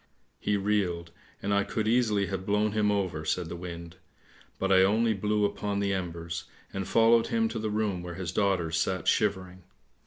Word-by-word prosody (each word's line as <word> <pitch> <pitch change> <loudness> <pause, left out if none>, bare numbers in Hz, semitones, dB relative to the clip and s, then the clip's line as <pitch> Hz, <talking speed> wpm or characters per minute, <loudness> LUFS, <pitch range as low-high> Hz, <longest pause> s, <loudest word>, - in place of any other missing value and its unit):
' - - -42
He 105 - 0
reeled, 95 -5 -1 0.3
and 100 +1 0
I 100 0 +3
could 110 +1 -2
easily 110 -4 +2
have 95 -1 -4
blown 105 +2 +1
him 105 -1 +2
over," 95 -6 -1
said 80 +2 -1
the - - -5
wind, 85 -1 -8 0.3
" - - -27
but 95 0 -1
I 95 -1 +7
only 110 +4 +3
blew 105 +1 +1
upon 100 0 -2
the 100 -1 0
embers, 85 -2 -4 0.3
and 95 -1 -3
followed 115 0 +4
him 115 -1 +1
to 115 0 -4
the 110 0 -2
room 105 -4 -1
where 90 -1 -7
his 90 -2 -4
daughters 95 -5 +1
sat 95 -1 -1
shivering. 95 -3 0
100 Hz, 195 wpm, -28 LUFS, 90-105 Hz, 0.3 s, I